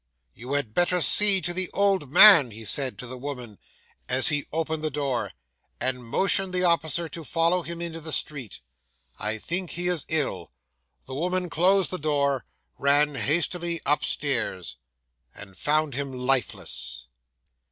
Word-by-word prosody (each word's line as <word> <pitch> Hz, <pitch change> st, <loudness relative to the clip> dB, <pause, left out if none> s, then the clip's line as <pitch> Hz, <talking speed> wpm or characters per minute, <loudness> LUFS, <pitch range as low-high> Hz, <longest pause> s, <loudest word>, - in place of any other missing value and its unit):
'"You 125 Hz, -, -8 dB
had 140 Hz, -7 st, -3 dB
better 175 Hz, +5 st, 0 dB
see 200 Hz, +2 st, +8 dB
to 175 Hz, +1 st, -2 dB
the 185 Hz, 0 st, -1 dB
old 195 Hz, -8 st, 0 dB
man," 165 Hz, -, +7 dB
he 110 Hz, 0 st, -10 dB
said 130 Hz, +4 st, +2 dB
to 125 Hz, -, -7 dB
the 125 Hz, +1 st, -8 dB
woman, 125 Hz, -6 st, -8 dB, 0.5 s
as 130 Hz, +1 st, +4 dB
he 145 Hz, -2 st, -2 dB
opened 160 Hz, 0 st, -4 dB
the 155 Hz, -, -1 dB
door, 140 Hz, -4 st, -3 dB, 0.5 s
and 125 Hz, -1 st, -2 dB
motioned 190 Hz, -, -1 dB
the 180 Hz, -, 0 dB
officer 170 Hz, -1 st, 0 dB
to 165 Hz, -, -8 dB
follow 165 Hz, +3 st, 0 dB
him 170 Hz, 0 st, -7 dB
into 165 Hz, -1 st, -5 dB
the 160 Hz, 0 st, -5 dB
street. 135 Hz, -8 st, -2 dB, 0.6 s
"I 110 Hz, +1 st, -3 dB
think 175 Hz, -, -4 dB
he 175 Hz, +1 st, -3 dB
is 175 Hz, -4 st, -1 dB
ill." 135 Hz, -, -2 dB, 0.5 s
The 130 Hz, -, -10 dB
woman 180 Hz, +4 st, -3 dB
closed 190 Hz, +2 st, +1 dB
the 185 Hz, -, -4 dB
door, 140 Hz, -3 st, -1 dB, 0.3 s
ran 145 Hz, +1 st, +2 dB
hastily 170 Hz, +6 st, -2 dB
upstairs, 135 Hz, -, -2 dB, 0.6 s
and 95 Hz, -1 st, -13 dB
found 150 Hz, +4 st, -1 dB
him 140 Hz, +1 st, -5 dB
lifeless. 120 Hz, -, -2 dB
150 Hz, 150 wpm, -24 LUFS, 130-170 Hz, 0.6 s, see